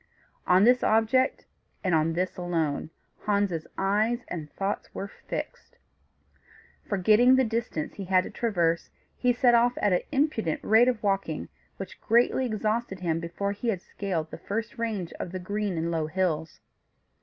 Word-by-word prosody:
On 185 +2 +5
this 245 +2 +5
object, 225 +5 +2 0.4
and 185 -3 +1
on 160 +1 +2
this 180 +2 -1
alone, 165 -5 -1 0.4
Hans's 200 -6 0
eyes 215 +5 +1
and 155 -4 -6
thoughts 195 +1 -3
were 200 - -4 0.2
fixed; - - -6 1.1
forgetting 215 +6 +5
the 260 - +4
distance 225 -9 -2
he 195 - -7
had 185 0 +3
to - - -8
traverse, 170 -8 0 0.3
he 250 - +2
set 245 0 +4
off 240 +1 +4
at 205 -2 +2
an 180 - +2
imprudent 270 - 0
rate 225 +3 +5
of 240 -4 0
walking, 195 -6 -1 0.3
which 195 -1 -8
greatly 240 +3 +3
exhausted 215 -2 -2
him 165 -2 0
before 170 +4 -3
he 205 +4 -5
had 210 -6 +1
scaled 170 -6 -3
the - - -8
first 225 +3 -4
range 210 -7 -2
of 175 - -4
the 185 - -4
green 205 0 -2
and 165 +1 -1
low 160 -2 -1
hills. 160 -3 -2
200 Hz, 160 wpm, -27 LUFS, 175-230 Hz, 1.1 s, On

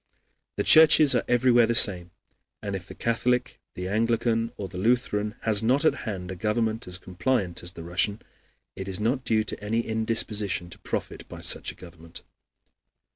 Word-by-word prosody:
The - - -1
churches 155 -2 +7
are 120 - +1
everywhere 120 -1 +3
the 115 - 0
same, 90 -5 +4 0.5
and 100 -1 -4
if 95 -1 -8
the - - -11
Catholic, 125 +2 -1 0.2
the 90 0 -5
Anglican, 115 +2 0
or 100 - -5
the 90 -1 -8
Lutheran 110 -1 0
Church - - -30
has 110 -2 +1
not 130 +7 +1
at - - +4
hand 95 -5 -6
a - - -6
government 110 +3 -2
as 90 0 -3
compliant 90 +1 -2
as 85 0 -4
the 85 - -10
Russian, 95 +5 -1 0.6
it 95 - -7
is 95 -1 -2
not 125 +5 -1
due 110 -3 +1
to 105 - -7
any 115 +3 -1
indisposition 110 -5 -1
to - - -12
profit - - -6
by - - -10
such - - +2
a - - -17
government. 85 -2 -12
110 Hz, 180 wpm, -25 LUFS, 95-115 Hz, 0.6 s, churches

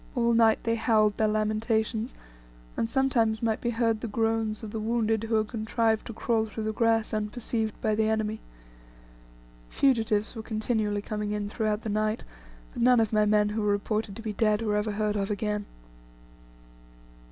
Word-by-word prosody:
All 235 -1 +2
night 225 -1 +4
they 230 0 0
howled 215 -2 +2
their 220 - +2
lamentations, 220 +2 0 0.6
and 225 - -1
sometimes 230 -4 +1
might 225 -1 0
be 240 - -1
heard 225 -2 0
the - - -3
groans 225 0 -1
of 215 - -6
the 220 - -3
wounded 225 0 0
who 225 0 0
had 215 -1 +1
contrived 220 -1 0
to 230 - -6
crawl 220 0 0
through 220 +1 -5
the 215 0 -2
grass 225 0 +1
unperceived 220 +1 -2
by 215 - +1
the 220 0 +1
enemy. 220 0 -1 1.3
Fugitives 220 -5 +1
were 225 - -6
continually 215 -2 -1
coming 210 -1 -3
in 205 -1 -3
throughout 215 0 -1
the 220 - -3
night, 215 +1 0 0.5
but - - -5
none 250 0 +5
of 220 -1 +1
my 210 0 +3
men 210 0 +3
who 215 +1 -2
were 210 - 0
reported 205 0 -1
to 225 - -9
be 215 -2 -3
dead, 215 +1 +1
were 210 -2 0
ever 210 0 0
heard 210 0 -1
of 200 -1 -1
again. 210 0 -2
220 Hz, 180 wpm, -27 LUFS, 210-225 Hz, 1.3 s, none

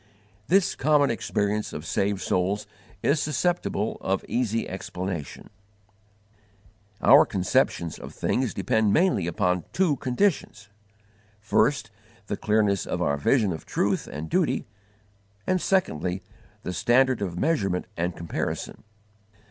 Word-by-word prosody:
This 190 +1 +3
common 145 0 +3
experience 105 -2 -1
of 75 - -6
saved 100 +2 0
souls 95 +3 0 0.4
is 145 +1 +2
susceptible 155 - -1
of 95 +1 -1
easy 115 -2 -1
explanation. 90 -4 -6 1.5
Our - - +8
conceptions 90 -3 0
of - - -8
things 125 -3 -1
depend 105 +1 +2
mainly 165 - +2
upon 90 -1 0
two 175 -7 +2
conditions: 125 - -1 0.7
first, 115 +2 +1 0.3
the 105 - -3
clearness 105 -2 +1
of - - -2
our 70 - +1
vision 105 - +2
of 80 - -9
truth - - 0
and 75 +4 -5
duty; - - 0 0.8
and 185 -1 +1
secondly, 95 - 0 0.4
the 90 - -4
standard 125 +6 +3
of 90 -4 -3
measurement 100 - 0
and 85 0 -2
comparison. 85 -1 -4
105 Hz, 115 wpm, -26 LUFS, 90-135 Hz, 1.5 s, Our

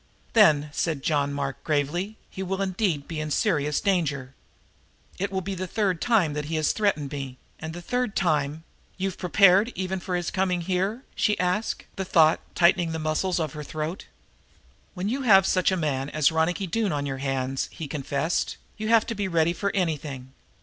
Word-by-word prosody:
"Then," 150 -1 +5
said 155 -5 -1
John 145 -2 +1
Mark 140 -1 -3
very - - -34 0.2
gravely, 180 +9 -4
"he 190 - -8
will 190 0 -2
indeed 190 -6 -1
be 160 -2 -4
in 155 0 -3
serious 150 - +1
danger. 145 -9 0 0.9
It 200 +2 -1
will 190 -1 -1
be 195 +2 -4
the 185 0 -4
third 190 -3 0
time 205 -11 +3
that 150 0 -3
he 160 +2 -3
has 155 -1 +2
threatened 155 -10 0
me. 135 -3 -5 0.2
And 160 - -5
the 175 - -8
third 245 -1 -1
time 155 -3 0 0.2
" - - -35
"You've 190 -1 -3
prepared 195 +4 +5
even 190 +1 -2
for 180 0 -3
his 175 -2 -2
coming 185 -2 0
here?" 190 +7 -1
she 210 - +1
asked, 180 +5 -1
the 190 - -1
thought 160 -3 +4 0.2
tightening 170 -1 +3
the - - -2
muscles 160 +4 0
of 155 -4 -2
her 150 - -6
throat. 155 +4 -5 0.9
"When 185 +2 -2
you 260 +6 -1
have 195 -7 +6
such 185 0 +2
a 185 - +1
man 140 -4 -1
as 155 0 +2
Ronicky 160 +4 +1
Doone 205 +2 0
on 145 -1 -1
your 135 -1 -3
hands," 135 -1 -2
he 160 - -6
confessed, 140 +3 -1 0.2
"you 215 0 -3
have 225 0 +5
to - - -3
be 205 -3 -2
ready 170 -1 +2
for 200 +3 -1
anything. 145 -7 -2
170 Hz, 195 wpm, -26 LUFS, 150-195 Hz, 0.9 s, have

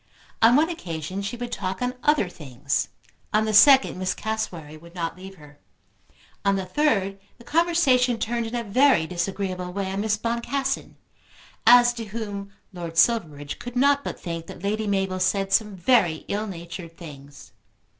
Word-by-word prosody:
On 230 +2 +6
one 315 +4 +3
occasion 185 - -5
she 205 +5 -4
would 245 0 -5
talk 190 -1 -3
on 250 0 -1
other 295 -9 +3
things. 140 -5 -3 0.5
On 215 0 +3
the 215 - -1
second 265 0 +6
Miss 185 0 -1
Cassewary 180 -9 -4
would 170 +3 -15
not 165 -2 -3
leave 190 +1 -11
her. 150 -3 -17 0.8
On 200 -1 +2
the 190 -1 -2
third 195 -4 0 0.2
the - - -16
conversation 285 -6 +2
turned 235 +1 -2
in 230 - -5
a 235 - -2
very 230 - +3
disagreeable 180 +1 -3
way 190 0 -3
on 195 +1 -2
Miss 215 0 0
Boncassen, 235 +5 -2 0.7
as 240 0 +7
to 230 -2 -6
whom 200 -2 -6 0.2
Lord 170 -2 -7
Silverbridge 155 -10 +1
could 245 0 -8
not 280 +2 +3
but - - -6
think 165 -1 -6
that - - -11
Lady 215 +2 -1
Mabel 190 -2 0
said 195 +1 0
some 210 -3 +2
very 175 -5 +2
ill 210 +2 -2
natured 170 -2 -8
things. 145 -4 -12
200 Hz, 165 wpm, -24 LUFS, 175-235 Hz, 0.8 s, as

